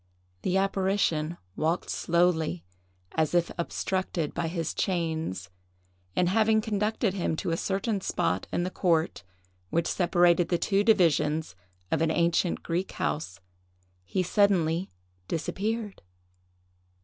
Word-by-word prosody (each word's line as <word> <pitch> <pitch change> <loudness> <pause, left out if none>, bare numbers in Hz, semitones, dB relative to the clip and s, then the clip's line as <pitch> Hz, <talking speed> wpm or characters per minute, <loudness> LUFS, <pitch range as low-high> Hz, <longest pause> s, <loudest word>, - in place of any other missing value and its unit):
The 185 - +1
apparition 190 -4 +1 0.2
walked 165 +3 -1
slowly, 165 - +1 0.5
as 160 +1 0
if 175 -1 +2
obstructed 175 -2 -2
by 170 -1 -1
his 165 -1 -2
chains; 160 - -2 0.6
and 180 - +3
having 220 +2 +4
conducted 215 -1 0
him 180 -4 -1
to 165 - -2
a - - +2
certain 195 +3 -1
spot 90 - -1
in 175 - 0
the 180 - -2
court, 165 - +1 0.5
which 170 +7 +1
separated 175 -1 +3
the 175 - +2
two 200 +3 +1
divisions 160 - +3 0.4
of - - +1
an 165 - +3
ancient 170 +1 +1
Greek 175 +3 -2
house, 100 - -3 0.6
he 185 - -1
suddenly 180 -3 +2 0.4
disappeared. 210 +5 -3
175 Hz, 120 wpm, -28 LUFS, 160-195 Hz, 0.6 s, having